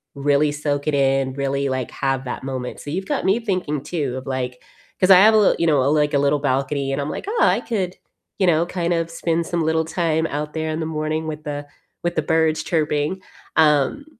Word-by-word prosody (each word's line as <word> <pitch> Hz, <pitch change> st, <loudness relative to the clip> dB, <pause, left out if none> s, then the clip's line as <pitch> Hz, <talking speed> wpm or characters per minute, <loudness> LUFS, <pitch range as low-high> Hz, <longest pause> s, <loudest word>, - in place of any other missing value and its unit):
really 145 Hz, +1 st, +2 dB
soak 145 Hz, -1 st, -2 dB
it 150 Hz, -, +1 dB
in, 135 Hz, -1 st, +2 dB
really, 140 Hz, 0 st, -1 dB
like, 130 Hz, -2 st, -3 dB
have 135 Hz, -1 st, -1 dB
that 125 Hz, -, -5 dB
moment, 130 Hz, -2 st, -4 dB
so 145 Hz, -, -8 dB
you've 190 Hz, +4 st, -3 dB
got -, -, -1 dB
me 195 Hz, +5 st, +3 dB
thinking 180 Hz, -, -2 dB
too 145 Hz, -5 st, -3 dB
of, 130 Hz, -, -8 dB
like 125 Hz, -1 st, -3 dB, 0.4 s
'Cause 185 Hz, +1 st, +4 dB
I 185 Hz, -, +10 dB
have 215 Hz, +3 st, +7 dB
a 220 Hz, -, +5 dB
little 210 Hz, -, +4 dB
you 170 Hz, -, +2 dB
know, 140 Hz, -3 st, +3 dB
like, 150 Hz, -1 st, +2 dB
a 140 Hz, -, +3 dB
little 140 Hz, +1 st, +2 dB
balcony 135 Hz, 0 st, -1 dB
and 140 Hz, -, -1 dB
I'm 145 Hz, -, -3 dB
like, -, -, -5 dB
"Oh, 455 Hz, +3 st, -1 dB
I -, -, +4 dB
could, 190 Hz, -6 st, -2 dB, 0.4 s
you 190 Hz, -, +3 dB
know, 170 Hz, 0 st, +3 dB
kind 175 Hz, -1 st, -1 dB
of 165 Hz, 0 st, -1 dB
spend 165 Hz, 0 st, -1 dB
some 170 Hz, -1 st, -1 dB
little 160 Hz, 0 st, +1 dB
time 160 Hz, 0 st, 0 dB
out 150 Hz, 0 st, -4 dB
there 160 Hz, 0 st, -2 dB
in 155 Hz, -, -3 dB
the -, -, -2 dB
morning 155 Hz, 0 st, -2 dB
with 155 Hz, -1 st, -5 dB
the 145 Hz, -1 st, -5 dB, 0.4 s
with 175 Hz, 0 st, -1 dB
the 155 Hz, -, +2 dB
birds 160 Hz, 0 st, +1 dB
chirping," 155 Hz, +2 st, -1 dB, 0.4 s
um, 150 Hz, -, +3 dB
150 Hz, 230 wpm, -21 LUFS, 140-170 Hz, 0.4 s, I